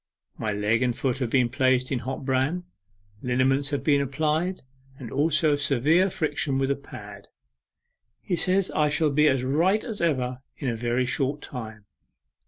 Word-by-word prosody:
My 110 Hz, -, -2 dB
leg 105 Hz, +3 st, +1 dB
and 125 Hz, -2 st, 0 dB
foot 130 Hz, -1 st, -1 dB
have 125 Hz, -4 st, -1 dB
been 125 Hz, -1 st, +3 dB
placed 130 Hz, -1 st, +1 dB
in 130 Hz, -, 0 dB
hot 130 Hz, +3 st, -5 dB
bran, 135 Hz, +7 st, 0 dB, 0.6 s
liniments 135 Hz, +2 st, +1 dB
have 145 Hz, -, -2 dB
been 145 Hz, -2 st, +3 dB
applied, 155 Hz, +6 st, -1 dB, 0.4 s
and 125 Hz, -5 st, -8 dB
also 155 Hz, +1 st, +2 dB
severe 145 Hz, +6 st, +2 dB
friction 150 Hz, -7 st, -1 dB
with 135 Hz, 0 st, +1 dB
a -, -, +1 dB
pad. 105 Hz, -7 st, -11 dB, 0.9 s
He 180 Hz, -, -2 dB
says 185 Hz, +3 st, +1 dB
I 150 Hz, -1 st, +2 dB
shall 150 Hz, 0 st, +2 dB
be 150 Hz, +2 st, +4 dB
as 135 Hz, -3 st, +2 dB
right 170 Hz, +11 st, +2 dB
as 220 Hz, -6 st, -5 dB
ever 130 Hz, -6 st, 0 dB, 0.2 s
in 135 Hz, -, -2 dB
a 115 Hz, -, -1 dB
very 120 Hz, +2 st, 0 dB
short 135 Hz, +3 st, -1 dB
time. 110 Hz, -5 st, -8 dB
135 Hz, 170 wpm, -25 LUFS, 125-150 Hz, 0.9 s, be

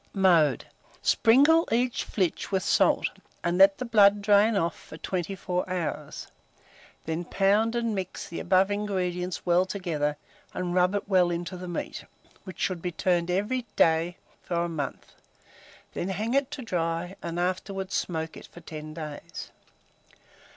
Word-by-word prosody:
Mode. 170 Hz, -, +4 dB, 0.4 s
Sprinkle 290 Hz, +8 st, +5 dB
each 245 Hz, +1 st, +1 dB
flitch 185 Hz, -2 st, -1 dB
with 190 Hz, -1 st, +1 dB
salt, -, -, +3 dB, 0.4 s
and 175 Hz, +1 st, 0 dB
let 195 Hz, 0 st, +7 dB
the 255 Hz, -, -4 dB
blood 205 Hz, -3 st, +5 dB
drain 205 Hz, +2 st, +4 dB
off 170 Hz, -3 st, 0 dB
for 155 Hz, -, -12 dB
24 180 Hz, +1 st, -3 dB
hours; 180 Hz, -3 st, -4 dB, 0.8 s
then 160 Hz, +2 st, -2 dB
pound 205 Hz, +5 st, +2 dB
and 230 Hz, -2 st, 0 dB
mix 190 Hz, -2 st, -4 dB
the 170 Hz, -, -6 dB
above 190 Hz, +2 st, +3 dB
ingredients 185 Hz, -3 st, -2 dB
well 175 Hz, +1 st, +4 dB
together 170 Hz, -6 st, -2 dB, 0.4 s
and 180 Hz, -1 st, -2 dB
rub 180 Hz, +2 st, +3 dB
it 205 Hz, -, -2 dB
well 185 Hz, -3 st, +4 dB
into 175 Hz, +2 st, -3 dB
the 180 Hz, 0 st, -7 dB
meat, 175 Hz, -, -5 dB, 0.4 s
which 185 Hz, -4 st, -9 dB
should 185 Hz, -3 st, -1 dB
be 180 Hz, -, -2 dB
turned 175 Hz, 0 st, 0 dB
every 210 Hz, +7 st, -1 dB
day 165 Hz, +1 st, +3 dB, 0.2 s
for 175 Hz, -, -4 dB
a -, -, -1 dB
month; 155 Hz, -5 st, -5 dB, 0.8 s
then 180 Hz, -, -3 dB
hang 215 Hz, +5 st, -2 dB
it 275 Hz, 0 st, +2 dB
to 285 Hz, -3 st, -6 dB
dry, 175 Hz, -2 st, -2 dB
and 170 Hz, +1 st, -4 dB
afterwards 185 Hz, +2 st, -2 dB
smoke 160 Hz, -2 st, -2 dB
it -, -, -11 dB
for 175 Hz, -, -14 dB
10 155 Hz, -1 st, -8 dB
days. 155 Hz, -3 st, -7 dB
185 Hz, 150 wpm, -27 LUFS, 170-200 Hz, 0.8 s, let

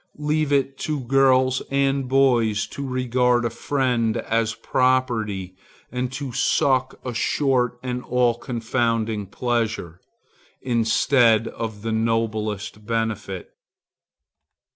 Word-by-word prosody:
Leave 150 Hz, 0 st, 0 dB
it 135 Hz, -1 st, +1 dB
to 150 Hz, -2 st, -2 dB
girls 130 Hz, 0 st, +3 dB
and 135 Hz, -1 st, +1 dB
boys 120 Hz, -6 st, +3 dB
to -, -, -8 dB
regard 125 Hz, -2 st, +1 dB
a 115 Hz, -, -1 dB
friend 120 Hz, -2 st, 0 dB
as 115 Hz, 0 st, -1 dB
property, 115 Hz, -8 st, 0 dB, 0.4 s
and 125 Hz, 0 st, -2 dB
to 135 Hz, -1 st, -5 dB
suck 130 Hz, +1 st, +1 dB
a 125 Hz, -, -3 dB
short 125 Hz, 0 st, +1 dB
and 125 Hz, -1 st, -3 dB
all 125 Hz, -1 st, +2 dB
confounding 115 Hz, -3 st, -1 dB
pleasure, 110 Hz, -6 st, -2 dB, 0.6 s
instead 115 Hz, -1 st, +3 dB
of 110 Hz, -2 st, -6 dB
the 115 Hz, -, -2 dB
noblest 110 Hz, -2 st, -1 dB
benefit. 110 Hz, -4 st, -3 dB
120 Hz, 105 wpm, -23 LUFS, 110-130 Hz, 0.6 s, girls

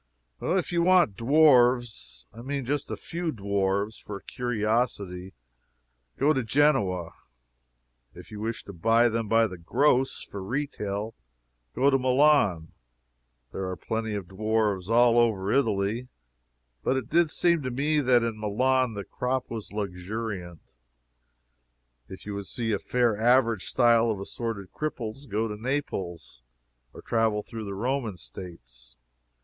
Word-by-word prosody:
If 185 Hz, -2 st, 0 dB
you 170 Hz, -1 st, +1 dB
want 175 Hz, -, +4 dB
dwarfs 120 Hz, -, +3 dB
I 115 Hz, -, -10 dB
mean 135 Hz, +1 st, -3 dB
just 145 Hz, +2 st, -2 dB
a -, -, -4 dB
few 170 Hz, -1 st, -4 dB
dwarfs 100 Hz, -1 st, -1 dB
for 105 Hz, -, -7 dB
a -, -, -16 dB
curiosity 110 Hz, -6 st, -2 dB, 0.8 s
go 145 Hz, +3 st, +3 dB
to 135 Hz, -, 0 dB
Genoa. 110 Hz, -, +1 dB, 1.0 s
If -, -, -13 dB
you 105 Hz, -, -7 dB
wish 115 Hz, +2 st, -4 dB
to 100 Hz, -, -10 dB
buy 115 Hz, +6 st, +3 dB
them 115 Hz, -1 st, -2 dB
by 115 Hz, +1 st, +4 dB
the 95 Hz, -4 st, -6 dB
gross, 130 Hz, -, +1 dB
for 100 Hz, -, -8 dB
retail, 110 Hz, -3 st, -3 dB, 0.6 s
go 140 Hz, +2 st, +3 dB
to 135 Hz, -, +3 dB
Milan. 130 Hz, -, +3 dB, 0.8 s
There 95 Hz, -1 st, -4 dB
are 95 Hz, -, -3 dB
plenty 110 Hz, +4 st, -3 dB
of 100 Hz, -3 st, -5 dB
dwarfs 105 Hz, -1 st, -1 dB
all 120 Hz, 0 st, +5 dB
over 105 Hz, -4 st, +1 dB
Italy, 110 Hz, -1 st, 0 dB, 0.8 s
but 135 Hz, -, +1 dB
it 130 Hz, -4 st, -3 dB
did 165 Hz, +3 st, +3 dB
seem 170 Hz, +1 st, +2 dB
to 130 Hz, -, -3 dB
me 145 Hz, +5 st, +1 dB
that 125 Hz, -3 st, +4 dB
in 115 Hz, -2 st, -3 dB
Milan 125 Hz, +3 st, +1 dB
the 100 Hz, -, -4 dB
crop 125 Hz, +4 st, -3 dB
was 110 Hz, -3 st, -6 dB
luxuriant. 100 Hz, -2 st, -5 dB, 1.4 s
If 95 Hz, -, -11 dB
you 105 Hz, -, -5 dB
would 100 Hz, -1 st, -5 dB
see 115 Hz, -2 st, -2 dB
a 100 Hz, -, 0 dB
fair 120 Hz, -3 st, +1 dB
average 115 Hz, -3 st, +3 dB
style 120 Hz, -2 st, +3 dB
of 105 Hz, -3 st, -1 dB
assorted 100 Hz, -1 st, -5 dB
cripples, 135 Hz, -3 st, -5 dB
go 110 Hz, +2 st, 0 dB
to 105 Hz, -, -5 dB
Naples, 95 Hz, -, -4 dB, 0.5 s
or -, -, -12 dB
travel 110 Hz, -2 st, +1 dB
through 110 Hz, -1 st, -7 dB
the 100 Hz, -1 st, -5 dB
Roman 120 Hz, -2 st, -2 dB
States. -, -, -11 dB
115 Hz, 145 wpm, -27 LUFS, 100-130 Hz, 1.4 s, all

